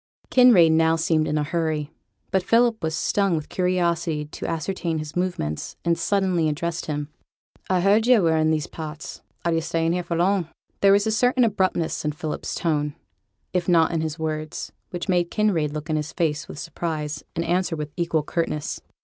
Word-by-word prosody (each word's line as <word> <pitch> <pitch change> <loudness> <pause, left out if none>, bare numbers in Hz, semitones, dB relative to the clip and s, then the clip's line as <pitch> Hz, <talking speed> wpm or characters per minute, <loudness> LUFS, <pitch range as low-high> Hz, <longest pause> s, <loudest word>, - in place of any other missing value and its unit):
Kinraid 230 -11 +7
now 160 0 +4
seemed 160 -1 +1
in 150 - 0
a 150 - +1
hurry; 155 -1 -2 0.4
but 190 - +2
Philip 230 +3 +3
was 160 -1 -1
stung 195 -2 +1
with 155 -2 -4
curiosity 170 -4 0
to 150 - -7
ascertain 165 0 -2
his 155 -1 -6
movements, 175 - -2
and 170 0 +3
suddenly 185 -4 +1
addressed 165 +3 -3
him: 150 -1 -3 0.6
'I 185 -1 +2
heard 210 +4 +3
yo' 245 -6 +6
were 165 -1 +3
i' 160 0 +2
these 155 -1 +1
parts. 155 -1 -8 0.2
Are 170 - +2
you 165 - +2
for - - -7
staying 165 0 +1
here 180 0 -1
long?' 175 0 +1 0.3
There 195 - +5
was 200 +1 +3
a 220 - +1
certain 245 +3 +3
abruptness 190 -6 0
in 150 0 -1
Philip's 155 0 -4
tone, 150 -3 -1 0.6
if 180 -1 0
not 165 -2 +4
in 165 -2 0
his 160 0 -3
words, 155 -1 -4 0.2
which 175 -1 -5
made 175 -2 +2
Kinraid 185 -9 +1
look 155 +1 -5
in 155 -2 0
his 150 0 -4
face 155 -3 -1
with - - -9
surprise, 150 -3 -4
and 170 - -1
answer 175 0 0
with 150 -1 -5
equal 170 -3 0
curtness. 155 -1 -2
165 Hz, 190 wpm, -24 LUFS, 155-180 Hz, 0.6 s, Kinraid